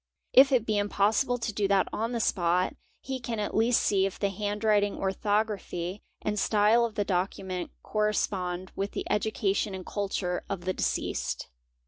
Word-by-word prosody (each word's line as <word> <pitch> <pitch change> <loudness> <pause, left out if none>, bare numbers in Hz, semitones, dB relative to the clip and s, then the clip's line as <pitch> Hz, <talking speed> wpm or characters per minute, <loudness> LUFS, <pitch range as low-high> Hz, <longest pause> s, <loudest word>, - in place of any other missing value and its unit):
If 270 +2 +8
it: 245 -4 +3
be 215 -2 +1
impossible 210 +5 +2
to 230 -2 -3
do 200 -1 +1
that 195 -1 +3
on 225 +2 -1
the 235 - -1
spot, 180 -3 +1 0.3
he 265 -1 -4
can 235 -2 -4
at 205 - -2
least 230 +2 +3
see 195 -1 +3
if 195 - -7
the 200 - 0
handwriting, 205 +1 +1
orthography, 195 -2 -1 0.2
and 210 0 -1
style 215 +3 +4
of 225 - -5
the 205 - 0
document 185 -1 -2
correspond 185 -4 -1
with 200 +1 -3
the - - -3
education 205 -2 0
and 185 -1 -7
_ - - -17
culture 195 -3 -1
of 195 -3 -3
the 185 - 0
deceased. - - -2
205 Hz, 170 wpm, -28 LUFS, 190-215 Hz, 0.3 s, If